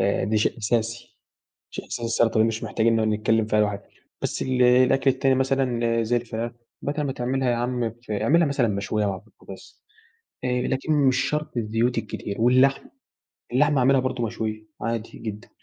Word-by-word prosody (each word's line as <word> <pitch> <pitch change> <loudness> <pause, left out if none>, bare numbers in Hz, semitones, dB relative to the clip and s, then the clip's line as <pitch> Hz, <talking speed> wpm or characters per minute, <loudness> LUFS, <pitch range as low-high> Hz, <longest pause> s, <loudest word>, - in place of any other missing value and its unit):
آآ، 100 0 +1
دي 110 +2 0
شيء 110 - 0
أساسي، 115 +2 -2 0.5
شيء - - -7
أساسي 120 - -5
السلطة 115 -1 +2
دي 110 - +5
مش 115 -1 -3
محتاجين 115 0 +1
نقعد 110 -1 +1
نتكلم 110 +1 +1
فيها 105 -1 +2
لوحدها. 105 -1 -1 0.3
بس - - -2
ال 130 -1 +1
الأكل 130 +2 +4
التاني 135 0 +2
مثلًا 125 -3 +1
زي 115 +2 +1
الفراخ 115 0 -3 0.3
بدل 145 +2 -2
ما 135 - -2
تعملها 130 +1 -1
ياعم 120 -1 -1 0.2
ف - - -9
أعملها 160 +11 +3
مثلًا 140 -4 +1
مشوية 105 +1 -1
وعلى 95 -2 -3
البوتجاز. - - -14 0.6
آآ 125 0 0
لكن 135 +5 -1
مش 135 -3 +3
شرط 150 -3 -3
الزيوت 115 +2 0
الكتير. 105 -2 -5
واللحمة، 130 +3 +3 0.6
اللحمة 145 +3 +3
أعملها 135 +1 +4
برضه 130 -2 -2
مشوية 110 -1 -4 0.2
عادي 115 0 -4
جدًا، 105 0 -7
120 Hz, 170 wpm, -24 LUFS, 110-130 Hz, 0.6 s, دي